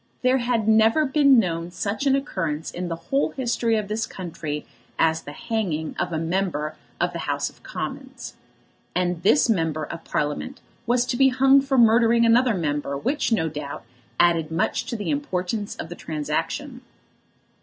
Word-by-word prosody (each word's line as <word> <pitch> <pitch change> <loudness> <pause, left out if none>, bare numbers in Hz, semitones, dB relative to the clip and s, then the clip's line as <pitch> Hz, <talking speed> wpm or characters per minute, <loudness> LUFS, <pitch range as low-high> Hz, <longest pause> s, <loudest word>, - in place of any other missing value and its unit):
There 255 +1 +4
had 240 -3 0
never 220 +7 +4
been 280 -1 +5
known 170 -5 0
such 205 +8 -2
an 270 - +4
occurrence 165 - -3
in 180 0 -4
the 165 - -3
whole 220 +12 0
history 240 -3 0
of 215 -2 -1
this 215 +2 -2
country 160 -5 -5 0.3
as 160 0 +2
the 145 - -9
hanging 170 -5 -3
of 180 - -1
a 160 - -1
member 165 -2 -1 0.2
of - - 0
the - - -4
House - - -1
of - - -25
Commons. - - -6 0.6
And 180 -1 0
this 220 +10 +4
Member 165 -8 0
of 165 +2 -7
Parliament 150 - -3 0.3
was 240 +1 +2
to 250 - -2
be 270 - +6
hung 270 +2 +5
for 270 0 0
murdering 235 0 +5
another 235 0 +4
member, 145 -4 -2
which, 265 - -1
no 160 -8 +2
doubt, 150 -2 -6 0.4
added 170 -2 +3
much 160 - -1
to - - -3
the 210 +4 -2
importance 205 -7 -2
of 165 - -7
the 175 - -7
transaction. 165 - -3
200 Hz, 170 wpm, -24 LUFS, 165-245 Hz, 0.6 s, be